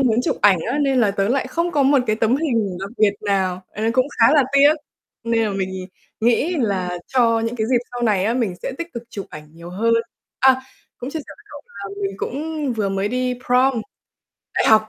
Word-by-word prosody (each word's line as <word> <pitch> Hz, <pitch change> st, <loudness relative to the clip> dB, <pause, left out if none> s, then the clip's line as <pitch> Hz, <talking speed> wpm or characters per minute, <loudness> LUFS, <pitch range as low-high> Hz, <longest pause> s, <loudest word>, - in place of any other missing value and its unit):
muốn 245 Hz, -5 st, +3 dB
chụp -, -, 0 dB
ảnh 195 Hz, -3 st, +5 dB
á, 275 Hz, -, -1 dB
nên 275 Hz, -3 st, +2 dB
là 215 Hz, -4 st, +3 dB
tớ 195 Hz, 0 st, 0 dB
lại 260 Hz, +2 st, +1 dB
không 335 Hz, +6 st, -1 dB
có 290 Hz, -, +3 dB
một 275 Hz, +1 st, +4 dB
cái 215 Hz, -, +1 dB
tấm 230 Hz, +4 st, +2 dB
hình 230 Hz, -, -1 dB
đặc 195 Hz, +1 st, -5 dB
biệt 210 Hz, -2 st, +4 dB
nào, 190 Hz, -3 st, 0 dB
ờ, 210 Hz, -, -6 dB
cũng 255 Hz, +2 st, +2 dB
khá 230 Hz, -, +7 dB
là 290 Hz, -, +6 dB
tiếc, 285 Hz, +2 st, +6 dB, 0.5 s
nên 230 Hz, -1 st, +1 dB
là 215 Hz, -, -1 dB
mình 195 Hz, -1 st, -2 dB
nhìn 185 Hz, -1 st, -6 dB, 0.3 s
nghĩ 245 Hz, +10 st, +2 dB
là 190 Hz, -, -1 dB
cho 230 Hz, -3 st, +2 dB
những 230 Hz, +2 st, -2 dB
cái 220 Hz, -1 st, -1 dB
dịp 250 Hz, -, +4 dB
sau 245 Hz, 0 st, -5 dB
này 205 Hz, -5 st, +2 dB
á, 225 Hz, +3 st, +1 dB
mình 230 Hz, -7 st, 0 dB
sẽ -, -, -3 dB
tích 335 Hz, 0 st, -6 dB
cực 235 Hz, -, -5 dB
chụp 200 Hz, -3 st, -6 dB
ảnh 150 Hz, 0 st, -10 dB
nhiều 170 Hz, +1 st, -10 dB
hơn. 225 Hz, +5 st, +1 dB, 0.4 s
A, 260 Hz, 0 st, +5 dB, 0.4 s
cũng 250 Hz, -, -5 dB
chia 320 Hz, -, -3 dB
sẻ 295 Hz, -, -8 dB
với 420 Hz, -, -21 dB, 0.2 s
cậu 200 Hz, -1 st, -8 dB
là 200 Hz, +1 st, -8 dB
mình 195 Hz, 0 st, -2 dB
cũng 300 Hz, +3 st, -3 dB
vừa 215 Hz, -4 st, -1 dB
mới 195 Hz, +1 st, -1 dB
đi 250 Hz, +2 st, -1 dB
prom 250 Hz, 0 st, +3 dB, 0.7 s
đại -, -, +2 dB
học. 215 Hz, 0 st, +5 dB
230 Hz, 235 wpm, -21 LUFS, 200-260 Hz, 0.7 s, khá